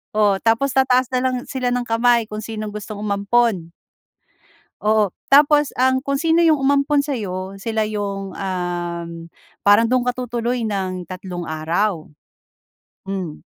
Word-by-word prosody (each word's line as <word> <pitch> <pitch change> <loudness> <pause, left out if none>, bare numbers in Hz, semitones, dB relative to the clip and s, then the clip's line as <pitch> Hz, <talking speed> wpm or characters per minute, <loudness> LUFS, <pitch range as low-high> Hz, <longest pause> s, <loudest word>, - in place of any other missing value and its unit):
O 205 -2 +3
tapos 230 +4 +2
tataas 255 -1 +3
na - - +3
lang 255 -1 +1
sila 255 -2 -2
ng 245 0 0
kamay 235 0 +3
kung 210 0 -5
sinong 215 -2 -5
gustong 210 0 -6
umampon. 200 -2 +1 1.1
Oo, 215 -2 +3 0.2
tapos 295 +1 +5
ang 260 0 +3
kung 275 0 0
sino 330 +1 +3
yung 310 -4 +4
umampon 280 +1 +2
sa'yo, 195 -8 -4
sila 220 0 -1
yung, 200 -2 -4
um, 175 -2 -3 0.6
parang 205 +3 +5
dun 255 -1 +2
ka 250 - +2
tutuloy 240 -1 -2
ng 185 -3 -3
tatlong 180 -1 -6
araw. 165 +3 -1 1.0
Hmm. 185 -6 -5
215 Hz, 135 wpm, -20 LUFS, 195-255 Hz, 1.1 s, tapos